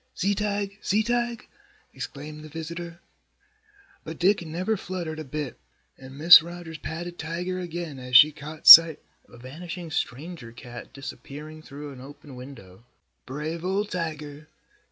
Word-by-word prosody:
"See 200 +2 0
Tige! 205 0 -3
See 210 +3 +1
Tige!" 240 0 -2 0.5
exclaimed 150 +2 -8
the 155 - -11
visitor. 170 +2 -8 1.0
But 160 0 -8
Dick 190 +1 +2
never 180 +7 -2
fluttered 175 -5 -6
a - - -5
bit 145 -2 -6 0.4
and 130 0 -13
Mrs. 165 +2 +10
Rogers 170 -1 -9
patted 175 +3 -7
Tiger 175 +3 -4
again 170 -5 -6
as 125 0 +4
she 150 +5 +7
caught 150 +1 -11
sight 165 -2 +11 0.3
of - - -24
a - - -14
vanishing 165 +7 -9
stranger 150 -2 -5
cat 120 +1 -11
disappearing 150 +3 -10
through 145 -1 -10
an 130 -2 -12
open 145 +1 -13
window. 120 -7 -13 0.4
"Brave 155 +5 -5
old 195 +3 -2
Tiger! 155 -4 -6
160 Hz, 145 wpm, -25 LUFS, 145-175 Hz, 1.0 s, sight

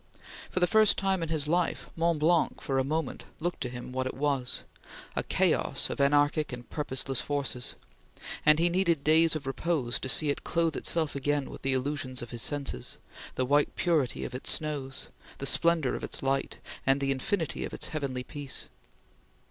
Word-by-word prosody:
For - - -1
the 180 - +5
first 215 +3 +5
time 195 -2 +1
in 165 - -2
his 155 -2 +1
life, 175 +2 0
Mont 170 0 +2
Blanc 165 +2 +2
for 135 -3 0
a - - +2
moment 155 0 -2
looked 175 +2 -2
to 125 - -1
him 125 0 -7
what 130 0 -1
it - - -5
was 135 -3 0 0.5
a - - +1
chaos - - +1
of - - -2
anarchic 145 +2 +3
and 120 -1 -7
purposeless 135 -3 0
forces 140 -4 -3 0.7
and 150 0 +6
he 170 +2 +3
needed 170 -4 +2
days 160 +1 +5
of 155 - -4
repose 135 -2 0
to 130 - -4
see 150 +3 +3
it - - -5
clothe 165 -2 +1
itself 160 -4 0
again 145 +1 0
with - - -9
the 135 0 +1
illusions 130 -1 -2
of 120 - -9
his 120 -1 -3
senses, 140 - -2 0.4
the 130 - +1
white 145 +3 +2
purity 160 -8 +1
of - - -6
its 125 - -1
snows, 140 -4 -2 0.3
the 140 - -4
splendor 165 -1 +3
of - - -4
its - - -3
light, 135 0 0 0.3
and 135 +1 +3
the 135 0 0
infinity 160 +6 -1
of - - -4
its - - -4
heavenly 135 -5 -3
peace. 145 0 -4
145 Hz, 190 wpm, -29 LUFS, 135-160 Hz, 0.7 s, and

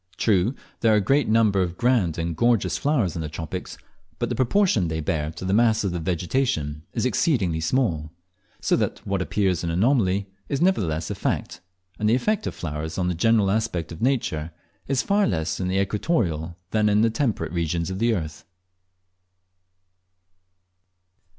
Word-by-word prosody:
True, 105 +4 +2 0.2
there 115 -2 +4
are - - +4
a - - +4
great 135 +7 +2
number 110 -3 +3
of 90 -1 -2
grand 120 -10 +2
and 85 0 -2
gorgeous 120 +4 +2
flowers 130 - 0
in 85 - -3
the 75 - -4
tropics, 80 0 -6 0.4
but - - -2
the - - -1
proportion 130 - +2
they 80 0 -2
bear 75 -2 -1
to 85 - -7
the 95 - 0
mass 110 0 +3
of 100 - 0
the 90 - -3
vegetation 85 - -1
is - - -1
exceedingly 105 - +1
small; 80 - 0 0.5
so - - +2
that - - -2
what 100 -1 -1
appears 95 -2 0
an 85 - -1
anomaly 100 0 +2 0.2
is 140 - -1
nevertheless 85 - +1
a - - 0
fact, - - -3 0.4
and 105 0 +2
the 115 - +4
effect 210 +11 0
of - - -4
flowers 80 0 -5
on 90 -1 0
the - - 0
general 105 +3 +3
aspect 100 -7 -1
of 80 - -9
nature 115 - 0 0.4
is 135 -2 +1
far 205 0 +2
less 80 -4 -1
in 90 - -1
the 95 +1 +1
equatorial 95 - -1
than 105 -1 +2
in 105 +1 +3
the 115 - +3
temperate 110 - -1
regions 85 +1 -1
of 95 - -4
the 115 0 +2
earth. 80 -4 -5
95 Hz, 175 wpm, -24 LUFS, 85-115 Hz, 0.5 s, there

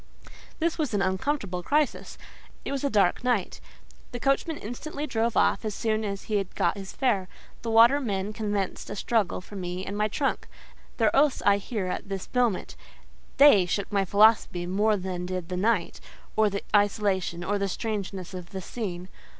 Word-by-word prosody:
This 335 0 -1
was 290 -9 0
an 200 - +2
uncomfortable 190 -1 -1
crisis. 295 - 0 0.5
It - - -3
was 275 -1 -2
a 280 - +2
dark 200 -4 +2
night. 245 -7 0 0.5
The 245 - -4
coachman 275 +4 0
instantly 285 +6 -5
drove 230 -4 0
off - - +3
as 215 -2 -3
soon 220 -1 0
as 200 -2 -4
he 215 - -1
had 195 -2 -4
got - - +1
his 195 -1 -7
fare: 205 -8 0 0.3
the 230 - -4
watermen 225 -4 +4
commenced 205 -3 -3
a - - -4
struggle 205 -4 0
for 205 - -12
me 180 0 -4
and 200 - -5
my 210 +1 +1
trunk. 270 +6 -2 0.5
Their 220 -3 +2
oaths 285 0 +3
I 200 0 +5
hear 205 -1 -4
at 185 +2 -4
this 195 -1 -4
moment: 235 - 0 0.6
they 265 -11 +7
shook 200 +3 -2
my 200 -1 +2
philosophy 200 -2 +4
more 205 +4 +2
than 180 -1 -4
did 185 -2 -4
the 180 - -3
night, 205 -2 0 0.4
or 215 -1 +4
the 200 0 -4
isolation, 200 -4 +1
or 205 +3 -1
the 200 0 -1
strangeness 195 -3 -4
of 180 -1 -7
the 190 - -6
scene. 185 -4 -5
205 Hz, 180 wpm, -27 LUFS, 190-230 Hz, 0.6 s, they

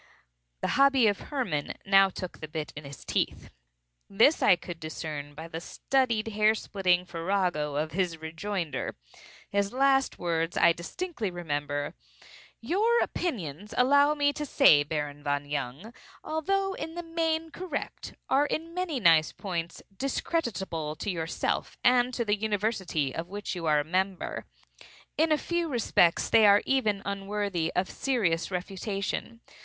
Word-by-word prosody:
The - - 0
hobby 275 -3 +6
of 205 -2 +2
Hermann 240 - -2
now 195 0 +6
took 185 -1 -7
the 155 - -6
bit 155 -1 -5
in 145 0 -8
his 140 -1 -10
teeth. - - -2 0.6
This 230 +10 +4
I - - +6
could 175 -1 -8
discern 150 -2 -6
by 160 +2 -7
the 165 0 -6
studied 235 +1 0
hair 215 +1 +3
splitting 180 -4 +1
farrago 170 -4 -1
of 155 +2 -1
his 175 -1 -1
rejoinder. 160 -2 -4 0.6
His 200 0 +1
last 270 +1 +2
words 165 -1 -1
I 170 - +6
distinctly 230 - -4
remember. 145 -4 -3 0.7
"Your 425 - +2
opinions, 205 - -4
allow 285 +4 +5
me 285 -1 +2
to 300 - -4
say, 270 - +6
Baron 145 -1 -3
von 145 0 -1
Jung, 145 - -4 0.3
although 390 +5 0
in 325 -3 -6
the 345 - -4
main 325 -1 -1
correct, 355 -6 -5
are, 280 +2 +3
in 330 +3 -3
many 355 -6 -2
nice 165 -6 +5
points, 170 -4 -5
discreditable 195 - -2
to 200 - -3
yourself 165 -2 -2
and 250 0 +4
to 235 - -1
the 205 -1 +2
university 200 - -1
of 165 +2 -5
which 205 +1 -4
you 170 -3 -4
are 150 -1 +4
a - - 0
member. 185 +3 -2 0.7
In 320 +1 +2
a 305 - +5
few 345 +1 -2
respects 220 - +3
they 220 -2 +6
are 205 +1 +6
even 215 -7 +1
unworthy 200 -3 -2
of 185 +1 +1
serious 195 -11 0
refutation. 195 +4 -4
195 Hz, 150 wpm, -28 LUFS, 165-265 Hz, 0.7 s, hobby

